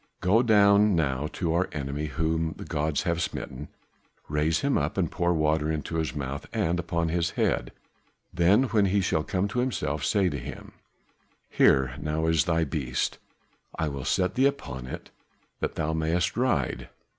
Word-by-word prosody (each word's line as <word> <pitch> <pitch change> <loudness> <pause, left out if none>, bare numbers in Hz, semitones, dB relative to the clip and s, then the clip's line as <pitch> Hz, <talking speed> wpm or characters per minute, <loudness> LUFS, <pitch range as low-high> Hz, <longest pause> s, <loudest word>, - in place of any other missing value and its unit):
Go 100 +6 +4
down 105 -3 +5
now 70 -3 0
to 85 -3 -1
our 90 +2 +1
enemy 70 +1 -3
whom 80 +3 -1
the - - -8
gods 75 0 -1
have 85 -1 0
smitten, 65 -5 -5 0.6
raise 75 +2 +1
him 140 0 +1
up 75 +6 -1
and 90 -4 0
pour 85 0 +1
water 80 -1 +1
into 80 +1 -3
his 80 -4 -2
mouth 70 -1 -4
and 85 +2 0
upon 85 -1 -1
his 85 +1 0
head, - - 0 0.6
then 90 +7 +4
when 110 -6 +2
he 100 +1 +2
shall 80 -4 +1
come 100 +1 -1
to 120 - -2
himself 85 - -1
say 100 -3 +2
to 70 -5 -2
him, - - -8 0.8
'Here 65 -2 +4
now 75 +1 -1
is 80 -1 +3
thy 85 -2 +2
beast, 70 -4 -2 0.6
I 80 - 0
will 70 -2 -5
set 90 +5 +1
thee 130 +5 +4
upon 65 - -5
it - - -8 0.5
that - - -2
thou 80 0 -1
mayest 80 +2 0
ride. 120 - 0
80 Hz, 170 wpm, -27 LUFS, 75-90 Hz, 0.8 s, down